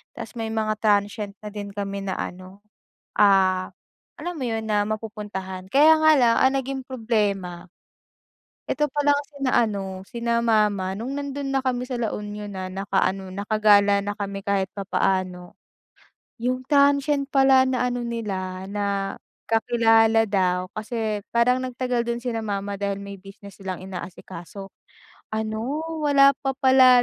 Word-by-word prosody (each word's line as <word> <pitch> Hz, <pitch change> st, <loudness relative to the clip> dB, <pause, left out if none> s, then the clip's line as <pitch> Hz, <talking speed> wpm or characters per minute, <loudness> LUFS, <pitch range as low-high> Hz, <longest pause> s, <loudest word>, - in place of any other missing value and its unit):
tapos 225 Hz, -2 st, -8 dB
may 225 Hz, 0 st, -3 dB
mga 215 Hz, -1 st, 0 dB
transient 205 Hz, -1 st, +1 dB
na -, -, -6 dB
din 205 Hz, -1 st, -6 dB
kami 200 Hz, -1 st, -4 dB
na 190 Hz, -1 st, -3 dB
ano, 185 Hz, +2 st, -7 dB, 0.6 s
ah, 190 Hz, -2 st, +4 dB, 0.5 s
alam 355 Hz, 0 st, -4 dB
mo -, -, -5 dB
yun, 225 Hz, -1 st, -2 dB
na 210 Hz, -1 st, +2 dB
mapupuntahan. 205 Hz, -4 st, -5 dB
Kaya 310 Hz, +3 st, +6 dB
nga 315 Hz, -, +7 dB
lang 235 Hz, -2 st, +4 dB
ang 265 Hz, +1 st, +4 dB
naging 265 Hz, 0 st, -4 dB
problema, 205 Hz, -8 st, -1 dB, 1.0 s
eto 300 Hz, 0 st, +1 dB
palang 290 Hz, 0 st, +2 dB, 0.2 s
sina 275 Hz, -2 st, -1 dB
ano, 195 Hz, -3 st, -4 dB
sina 235 Hz, -1 st, -1 dB
mama 210 Hz, -4 st, +2 dB
nung 230 Hz, +6 st, -5 dB
nandun 280 Hz, -1 st, -4 dB
na 270 Hz, -, +2 dB
kami 250 Hz, -1 st, -1 dB
sa 255 Hz, -, -2 dB
La 225 Hz, -, -1 dB
Union 210 Hz, 0 st, -6 dB
na 185 Hz, -1 st, -4 dB
nakaano, 195 Hz, 0 st, -1 dB
nakagala 205 Hz, 0 st, +4 dB
na 205 Hz, 0 st, -2 dB
kami 200 Hz, -1 st, -4 dB
kahit 195 Hz, -2 st, +1 dB
papaano. 185 Hz, -2 st, -1 dB, 0.8 s
Yung 255 Hz, +2 st, -1 dB
transient 280 Hz, 0 st, +3 dB
pala 270 Hz, -1 st, +5 dB
na 255 Hz, -1 st, 0 dB
ano 245 Hz, 0 st, -2 dB
nila, 190 Hz, -5 st, -4 dB
na 200 Hz, -1 st, -2 dB, 0.4 s
kakilala 225 Hz, -1 st, +4 dB
daw, 185 Hz, -2 st, 0 dB
kasi 215 Hz, -1 st, -3 dB
parang 250 Hz, +2 st, +4 dB
nagtagal 250 Hz, -1 st, -1 dB
dun 235 Hz, 0 st, -1 dB
sina 230 Hz, -2 st, -2 dB
mama 200 Hz, -1 st, -3 dB
dahil 200 Hz, 0 st, -2 dB
may 200 Hz, 0 st, -8 dB
business 195 Hz, +1 st, -13 dB
silang 190 Hz, -2 st, -5 dB
inaasikaso, 185 Hz, +1 st, -8 dB, 0.6 s
ano, 220 Hz, +6 st, -2 dB, 0.2 s
wala 280 Hz, -1 st, +6 dB
pa 270 Hz, -1 st, -1 dB
pala 260 Hz, -2 st, +6 dB
215 Hz, 145 wpm, -24 LUFS, 195-250 Hz, 1.0 s, nga